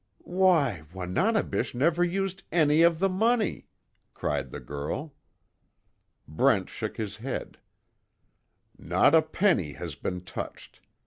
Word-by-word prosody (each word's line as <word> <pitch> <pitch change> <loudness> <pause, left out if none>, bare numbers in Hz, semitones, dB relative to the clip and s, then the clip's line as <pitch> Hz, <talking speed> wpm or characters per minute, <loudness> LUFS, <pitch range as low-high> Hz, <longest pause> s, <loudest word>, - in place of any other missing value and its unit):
"Why, 170 - +2
Wananebish 125 - 0
never 165 +7 +2
used 195 +2 -1
any 155 -1 +4
of 170 -1 +5
the 195 +4 +2
money!" 220 +2 0 0.5
cried - - -2
the - - -7
girl. 75 - -5 1.1
Brent 75 +1 +2
shook - - -5
his 105 -2 -4
head: 125 +4 -5 1.2
"Not 145 - +3
a 160 - +7
penny 155 - +1
has - - -6
been 90 -1 -4
touched. 90 - -8
160 Hz, 115 wpm, -27 LUFS, -, 1.2 s, a